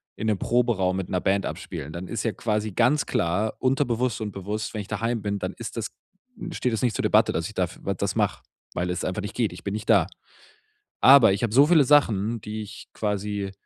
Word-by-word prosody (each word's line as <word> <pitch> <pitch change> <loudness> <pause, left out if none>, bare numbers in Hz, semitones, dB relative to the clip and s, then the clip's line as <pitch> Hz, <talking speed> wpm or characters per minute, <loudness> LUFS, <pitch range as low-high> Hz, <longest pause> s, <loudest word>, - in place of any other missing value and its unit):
in - - -5
'nem 105 -3 +1
Proberaum 115 -7 +1
mit 95 - -4
'ner 90 - 0
Band 100 +1 +1
abspielen, 75 +3 -6
dann 90 +2 -6
ist 110 +1 -3
ja 115 - 0
quasi 105 -1 -2
ganz 125 +9 +2
klar, 100 +6 0
unterbewusst 125 -2 0
und 105 -2 -3
bewusst, 105 +3 -4
wenn 110 - -3
ich 95 - -10
daheim 115 +2 -2
bin, 100 0 -2
dann 95 0 -4
ist 115 0 -8
das 110 -1 -2 0.6
steht 125 -6 -1
das 110 - -1
nicht 120 -5 +1
zur - - -2
Debatte, - - +4
dass - - -2
ich - - -10
da - - +1
f - - -13
w - - -1
das - - -2
mache, - - 0 0.3
weil 90 0 -2
es 90 -1 -2
einfach 95 +3 -2
nicht 105 - -6
geht. 115 -6 0
Ich 90 - -11
bin 100 - -2
nicht 110 0 -5
da. - - +5 0.9
Aber 135 -7 +8
ich 100 - -3
habe 110 - -1
so 140 +4 +6
viele 160 -3 +6
Sachen, 115 -6 +3
die 110 +1 -5
ich 105 +1 -10
quasi 105 -1 -2
105 Hz, 235 wpm, -25 LUFS, 100-120 Hz, 0.9 s, Aber